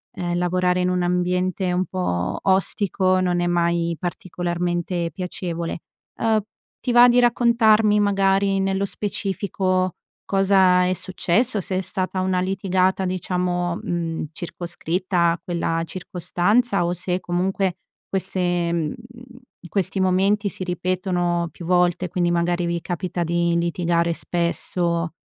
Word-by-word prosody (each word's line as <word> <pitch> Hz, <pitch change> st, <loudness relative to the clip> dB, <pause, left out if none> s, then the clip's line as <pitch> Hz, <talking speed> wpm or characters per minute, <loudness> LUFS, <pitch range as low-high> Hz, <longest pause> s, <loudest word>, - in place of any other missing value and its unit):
ehm, 175 Hz, -2 st, -2 dB
lavorare 180 Hz, 0 st, +1 dB
in 180 Hz, -, +1 dB
un 180 Hz, 0 st, 0 dB
ambiente 180 Hz, +1 st, 0 dB
un 180 Hz, +1 st, +1 dB
po' 90 Hz, -, -2 dB
ostico 190 Hz, 0 st, +2 dB
non 180 Hz, -1 st, +1 dB
è 175 Hz, -, +1 dB
mai 170 Hz, -1 st, +1 dB
particolarmente 175 Hz, -1 st, -2 dB
piacevole. 175 Hz, -3 st, -4 dB, 0.4 s
Uhm, 220 Hz, -1 st, +2 dB, 0.4 s
ti 250 Hz, -, -2 dB
va 240 Hz, +1 st, +8 dB
di 245 Hz, 0 st, +4 dB
raccontarmi 225 Hz, -3 st, +4 dB
magari 195 Hz, -1 st, +2 dB
nello 195 Hz, +1 st, 0 dB
specifico 190 Hz, -2 st, -1 dB, 0.3 s
cosa 190 Hz, -2 st, +4 dB
è 185 Hz, -, +1 dB
successo? 195 Hz, +5 st, 0 dB
Se 185 Hz, 0 st, -3 dB
è -, -, 0 dB
stata 185 Hz, +1 st, -3 dB
una 185 Hz, -1 st, +1 dB
litigata 190 Hz, 0 st, +1 dB
diciamo, 180 Hz, -1 st, -1 dB
mhmm, 165 Hz, -2 st, -3 dB
circoscritta 175 Hz, +1 st, -1 dB
a 170 Hz, -, -3 dB
quella 165 Hz, -1 st, -1 dB
circostanza, 185 Hz, +4 st, 0 dB
o 175 Hz, -, 0 dB
se 180 Hz, +1 st, -2 dB
comunque 185 Hz, +1 st, -1 dB, 0.3 s
queste, 180 Hz, -3 st, 0 dB
mhmm 160 Hz, -3 st, -1 dB, 0.8 s
questi 195 Hz, -1 st, -1 dB
momenti 195 Hz, +3 st, +2 dB
si 185 Hz, -, -5 dB
ripetono 180 Hz, -1 st, -1 dB
più 170 Hz, -, -10 dB
volte, 180 Hz, 0 st, +2 dB
quindi 175 Hz, 0 st, 0 dB
magari 175 Hz, +1 st, +1 dB
vi 170 Hz, 0 st, -1 dB
capita 175 Hz, 0 st, -3 dB
di 170 Hz, +1 st, +1 dB
litigare 170 Hz, 0 st, 0 dB
spesso 170 Hz, 0 st, -1 dB
180 Hz, 125 wpm, -22 LUFS, 175-190 Hz, 0.8 s, va